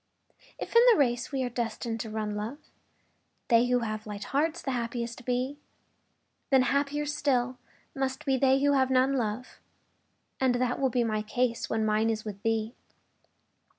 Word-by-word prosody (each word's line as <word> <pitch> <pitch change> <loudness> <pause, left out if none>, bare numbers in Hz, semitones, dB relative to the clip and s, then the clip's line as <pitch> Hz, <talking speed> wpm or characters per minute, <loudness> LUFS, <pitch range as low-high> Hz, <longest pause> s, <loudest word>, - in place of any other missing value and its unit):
If - - -7
in 465 - +9
the - - +4
race 245 -3 +1
we 270 -2 -1
are 250 - -2
destined 230 -1 -3
to 220 - -4
run, 215 -1 -3
love, 215 +7 -4 0.9
They 235 0 +5
who 245 0 +2
have 215 -1 -4
light 205 -1 -6
hearts 310 +4 0
the 270 - -3
happiest 235 0 -3
be, 255 +3 -1 0.9
Then 265 -2 +5
happier 285 +2 0
still 260 -4 0 0.4
must 265 -1 -2
be 270 - +2
they 265 +1 +3
who 285 0 +4
have 260 -1 +3
none, 260 +1 +3
love. 240 -1 -3 0.8
And 260 -2 +2
that 245 0 0
will 270 -1 +2
be 245 0 +1
my 215 -2 -1
case 235 +2 -1
when 220 -1 0
mine 215 +1 +2
is 220 -1 -2
with 200 -2 -7
thee. 225 +1 -1
245 Hz, 170 wpm, -28 LUFS, 225-265 Hz, 0.9 s, in